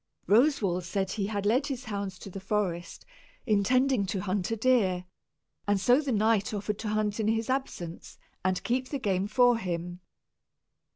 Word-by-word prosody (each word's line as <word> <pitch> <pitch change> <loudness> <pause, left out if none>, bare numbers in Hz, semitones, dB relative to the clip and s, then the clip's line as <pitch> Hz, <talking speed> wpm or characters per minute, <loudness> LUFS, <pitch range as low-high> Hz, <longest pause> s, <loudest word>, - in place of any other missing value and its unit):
Roswal 210 - +3
said 190 +2 -2
he 200 -2 -2
had 205 -1 -3
led 250 +7 +2
his 260 -3 -4
hounds 200 -4 -4
to 195 - -10
the 195 - -6
forest, 190 -4 -2 0.4
intending 245 +1 +2
to 195 -1 -2
hunt 190 -1 -1
a 225 - 0
deer; 205 -7 +2 0.6
and 205 -1 +2
so 245 +8 +4
the 285 -3 -2
knight 215 -1 +2
offered 205 0 -3
to 220 - -3
hunt 210 0 0
in 215 - 0
his 225 +2 0
absence 185 -11 -4 0.3
and 185 -1 0
keep 255 +1 -1
the 285 - -2
game 195 -5 0
for 245 +2 +4
him. 175 -2 -4
210 Hz, 170 wpm, -28 LUFS, 190-235 Hz, 0.6 s, so